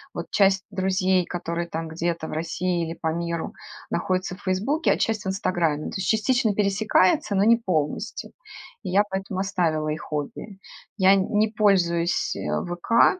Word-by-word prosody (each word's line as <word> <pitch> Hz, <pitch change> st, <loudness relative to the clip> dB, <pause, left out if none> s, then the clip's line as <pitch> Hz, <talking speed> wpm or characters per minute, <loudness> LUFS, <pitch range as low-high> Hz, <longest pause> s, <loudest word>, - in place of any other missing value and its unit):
вот -, -, -6 dB
часть 195 Hz, -1 st, +3 dB
друзей, 185 Hz, -1 st, +1 dB
которые 170 Hz, -1 st, -3 dB
там 165 Hz, -1 st, -4 dB
где-то 170 Hz, 0 st, -2 dB
в -, -, -7 dB
России 170 Hz, +2 st, -1 dB
или 165 Hz, -, -5 dB
по 160 Hz, -1 st, -1 dB
миру 170 Hz, -1 st, -3 dB, 0.4 s
находятся 185 Hz, +1 st, -1 dB
в 205 Hz, -, -18 dB
"Фейсбуке", 215 Hz, -, +1 dB
а -, -, -2 dB
часть 220 Hz, -3 st, 0 dB
в -, -, -3 dB
"Инстаграме", 175 Hz, -5 st, 0 dB
то -, -, -11 dB
есть 190 Hz, -, -3 dB
частично 220 Hz, -1 st, +2 dB
пересекается, 200 Hz, -1 st, +2 dB
но 195 Hz, -, +3 dB
не 230 Hz, +2 st, +6 dB
полностью. 165 Hz, -10 st, -2 dB, 0.5 s
И 190 Hz, -, -4 dB
я 200 Hz, +3 st, +4 dB
поэтому 190 Hz, 0 st, -3 dB
оставила 165 Hz, -6 st, 0 dB
их 155 Hz, +1 st, -5 dB
обе. 150 Hz, +7 st, -5 dB, 0.4 s
Я 195 Hz, 0 st, +6 dB
не 210 Hz, +3 st, +1 dB
пользуюсь, 180 Hz, -6 st, +2 dB
э, -, -, -6 dB, 0.3 s
"ВК". 230 Hz, -, +3 dB
185 Hz, 165 wpm, -24 LUFS, 170-200 Hz, 0.5 s, не